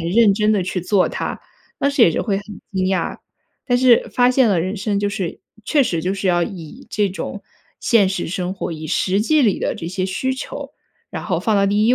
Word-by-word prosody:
很 165 +1 -2
认 215 0 +5
真 210 +1 +2
地 210 -2 +2
去 185 0 -2
做 185 +2 +2
它。” - - -4 0.4
当 280 - +2
时 280 -3 +3
也 175 - +7
是 - - -1
会 200 -3 0
很 200 - -5 0.3
惊 190 -1 0
讶。 190 0 -1 0.5
但 245 -2 +2
是 250 -2 +4
发 245 0 +4
现 255 -1 +4
了 195 -4 +2
人 185 +5 -2
生 200 +1 -1
就 205 0 0
是 195 -4 -4 0.3
确 285 +2 +3
实 170 -8 -1
就 185 - 0
是 195 0 -3
要 175 -1 +3
以 170 -4 -7
这 205 -1 +1
种 195 +2 -6 0.3
现 210 -5 +3
实 190 -2 -2
生 180 +1 -3
活、 190 -3 -4
以 155 -1 -7
实 190 +4 +1
际 305 +8 +3
里 220 -8 +2
的 - - 0
这 165 - -6
些 185 +2 -2
需 260 +8 -1
求， - - -7 0.4
然 - - -5
后 180 -5 -1
放 210 +5 0
到 200 -1 +3
第 205 +2 +2
1 245 - +5
200 Hz, 250 characters per minute, -20 LUFS, 185-225 Hz, 0.5 s, 也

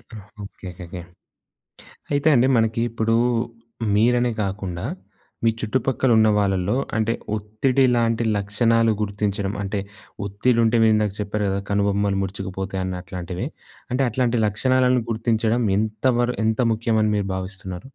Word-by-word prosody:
Okay. 115 0 -14 0.3
Okay. 100 -1 -9 0.2
Okay. 90 +1 -7 1.1
అయితే 145 +2 +1
అండి. 125 +1 +4
మనకి 115 0 +1
ఇప్పుడు 115 0 0 0.8
మీరనే 120 +3 +3
కాకుండా, 95 -3 -4 0.6
మీ 115 - +5
చుట్టుపక్కల 130 +3 0
ఉన్న 110 0 +5
వాళ్ళలో 95 +1 +1 0.2
అంటే, 110 +1 +1 0.2
ఒత్తిడి 110 +6 +1
లాంటి 115 -1 +1
లక్షణాలు 115 +3 +2
గుర్తించడం 100 -1 -2
అంటే, 100 +1 -2 0.5
ఒత్తిడుంటే 115 +3 +2
మీరిందాక 110 -2 +3
చెప్పారు 105 0 -2
కదా! 100 +1 -1
కనుబొమ్మలు 100 -1 +1
ముడుచుకుపోతాయి 95 0 -4
అన్నట్లాంటివి. 90 0 -5 0.4
అంటే 130 +2 +1
అట్లాంటి 120 0 +1
లక్షణాలను 125 +3 +2
గుర్తించడం 115 +1 +1
ఎంత 110 +2 -2
వర 120 0 +2 0.2
ఎంత 110 +1 +1
ముఖ్యమని 110 -1 +1
మీరు 100 -1 -1
భావిస్తున్నారు? 95 -1 -6
110 Hz, 120 wpm, -22 LUFS, 100-115 Hz, 1.1 s, మీ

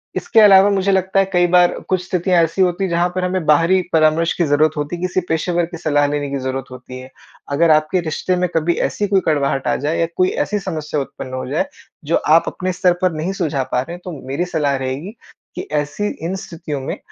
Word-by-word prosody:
इसके 225 - +2
अलावा 200 -1 +7
मुझे 195 -1 +1
लगता 190 0 +1
है 195 - +3
कई 175 0 +4
बार 175 0 +5 0.2
कुछ 185 -1 0
स्थितियाँ 180 -1 +2
ऐसी 165 +4 -1
होती 180 +1 0
है 190 - -1
जहाँ 170 +1 +1
पर 185 - -1
हमें 180 -2 -2
बाहरी 165 +5 +4
परामर्श 160 +1 +3
की 175 - +2
ज़रूरत 150 +1 +2
होती 150 +3 -3
है, 175 - -9
किसी 185 0 0
पेशेवर 170 +2 0
की 170 0 -9
सलाह 145 -3 +1
लेने 145 0 -2
की 140 - -1
ज़रूरत 130 0 -3
होती 130 0 -10
है। 130 - -11 0.4
अगर 160 +3 +3
आपके 155 +4 +2
रिश्ते 170 +3 -2
में 180 - +1
कभी 165 +1 +2
ऐसी 205 - -3
कोई 195 -1 +2
कड़वाहट 140 -3 0
आ - - +2
जाए 155 +2 0
या 165 - +1
कोई 185 0 +3 0.2
ऐसी 210 0 -1
समस्या 155 -6 -4
उत्पन्न 130 -1 -8
हो 130 - -4
जाए 155 - 0 0.4
जो 160 - +1 0.2
आप 165 - +5
अपने 185 0 -3
स्तर 180 0 +2
पर 185 -1 +2
नहीं 160 +5 -3
सुलझा 155 -8 -1
पा 125 - +2
रहे 170 +6 -7
हैं 175 - -13
तो 180 - -5 0.2
मेरी 140 +7 -2
सलाह 150 -5 0
रहेगी 135 - -5 0.4
कि - - -4
ऐसी 150 +7 -1 0.2
इन 180 +3 -2
स्थितियों 165 -7 -6
में 135 - -4
165 Hz, 230 wpm, -18 LUFS, 145-185 Hz, 0.4 s, अलावा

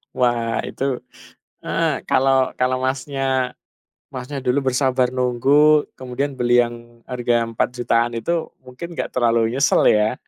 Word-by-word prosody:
Wah, 120 -2 0
itu - - -6 0.8
heeh, - - -1
kalau 135 0 +2
kalau 125 0 +1
Masnya 130 -1 -1 0.5
Masnya 130 +2 -6
dulu 130 +1 0
bersabar 125 -1 +1
nunggu 140 +4 +3 0.2
kemudian 130 +2 -3
beli 120 0 +4
yang 120 0 -10
harga 120 -2 0
Rp4.000.000-an 115 +1 -1
itu, 115 +8 -2 0.3
mungkin 150 +7 -9
nggak - - -4
terlalu 115 -2 +1
nyesel 135 +1 +2
ya? 110 +3 0
125 Hz, 125 wpm, -21 LUFS, 120-135 Hz, 0.8 s, beli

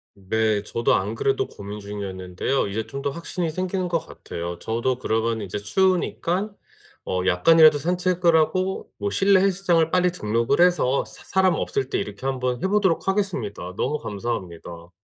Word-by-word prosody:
네. 105 +2 0
저도 115 +2 0
안 100 +4 0
그래도 135 +4 0
고민 100 +1 -8
중이었는데요 100 +3 -3
이제 110 +3 -3
좀 135 +5 -6
더 140 - -1
확신이 170 +2 -3
생기는 185 +2 -2
것 170 - +2
같아요. 85 - -7
저도 120 +3 -1
그러면 115 -1 0
인제 100 -1 -4
추우니깐 185 - 0 0.5
어 90 0 -1
약간이라도 155 - +6
산책을 175 +1 +1
하고 185 +4 0
뭐 100 0 -2
실내 195 - +4
헬스장을 180 -4 +2
빨리 180 0 +3
등록을 115 +2 0
해서 175 -7 +3
사 - - -14
사람 190 -1 +2
없을 130 - -2
때 - - 0
이렇게 105 +5 -5
한번 125 -2 -2
해 - - +2
보도록 190 -4 +1
하겠습니다. 120 - -2
너무 150 - -1
감사합니다. 90 -6 -6
130 Hz, 365 characters per minute, -23 LUFS, -, 0.5 s, 약간이라도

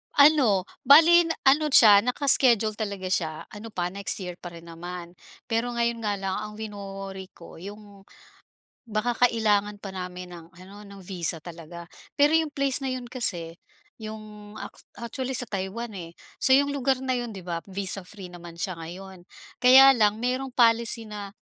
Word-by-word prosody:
Ano, 280 -10 +5 0.2
bale 330 +4 +7
na 330 - -2
ano 295 +3 +4
siya, 220 -8 +7
naka-iskediul 240 -3 +3
talaga 200 -3 -4
siya, 160 -4 -2
ano 210 +2 -9
pa 180 0 -2
next 200 +1 -1
year 180 -1 -8
pa - - -9
rin 165 0 -12
naman. 175 +1 -8 0.4
Pero 235 +1 -1
ngayon 235 0 -1
nga 210 -2 -2
lang 195 -1 -3
ang 210 0 -7
wino-worry 195 -3 -8
ko 170 -1 -14
’yong 200 0 -12 0.8
baka 225 +3 -1
kailangan 210 -3 +1
pa 195 -2 -8
namin 180 -1 -7
ng 165 -1 -12
ano, 190 +4 -14
no'ng 200 -1 -13
visa 175 -3 -2
talaga. 170 +1 -11 0.3
Pero 295 +2 +5
’yong 320 -2 +1
place 275 -1 +1
na 265 - -2
’yon 255 -1 -5
kasi, 180 -10 -3 0.5
’yong 215 -1 -10
ak - - -9 0.2
actually 255 +3 -5
sa 245 - -2
Taiwan, 205 +4 -5
eh. 170 -2 -8 0.3
So - - +2
’yong 280 +2 +4
lugar 265 -1 0
na 260 -1 -2
’yon, 240 -2 -4
’di 195 - -9
ba, 170 -1 -4
visa-free 195 0 -5
naman 170 -1 -12
siya 185 -2 -3
ngayon. 180 +3 -10 0.4
Kaya 265 +1 +8
lang 210 -1 +2
mayroong 255 +2 -2
policy 230 -2 +2
na 205 -2 -8
210 Hz, 170 wpm, -25 LUFS, 185-245 Hz, 0.8 s, Kaya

